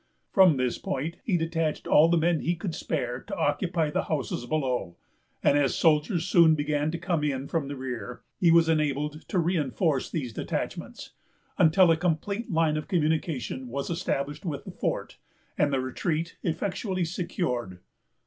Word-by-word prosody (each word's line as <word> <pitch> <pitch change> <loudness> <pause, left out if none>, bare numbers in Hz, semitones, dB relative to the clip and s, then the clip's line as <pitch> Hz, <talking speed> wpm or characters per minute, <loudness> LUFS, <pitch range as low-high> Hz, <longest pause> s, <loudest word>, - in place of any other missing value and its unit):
From 185 -7 +6
this 130 -1 -1
point 150 +5 -3
he 190 -6 +1
detached 165 -1 -1
all 155 +2 +5
the 170 - +3
men 165 0 +2
he 175 - 0
could 175 -1 -4
spare 125 -7 -3
to - - -6
occupy 160 0 0
the - - -1
houses 135 -5 -3
below; 125 - -1 0.5
and 145 - +4
as 140 -3 +1
soldiers 160 +2 +2
soon 170 -4 +5
began 150 0 0
to 170 - -3
come 170 -2 -1
in 140 -2 -1
from 160 -4 -1
the 140 - -5
rear, 125 -3 -6 0.2
he 175 - +4
was 165 0 +6
enabled 150 -1 0
to 190 - -2
re 175 +2 +2
enforce 145 -1 0
these 130 -8 -4
detachments, - - -5 0.5
until 170 +2 +6
a 165 - +3
complete 180 +7 -1
line 160 -2 +2
of 155 - -5
communication 155 - -1
was 140 +6 -4
established 145 -3 -2
with 145 -6 -4
the - - -7
fort, - - -3 0.4
and 145 -1 +2
the 135 - +1
retreat 160 +5 -2
effectually 185 +2 -2
secured. 160 - -3
155 Hz, 170 wpm, -27 LUFS, 140-170 Hz, 0.5 s, From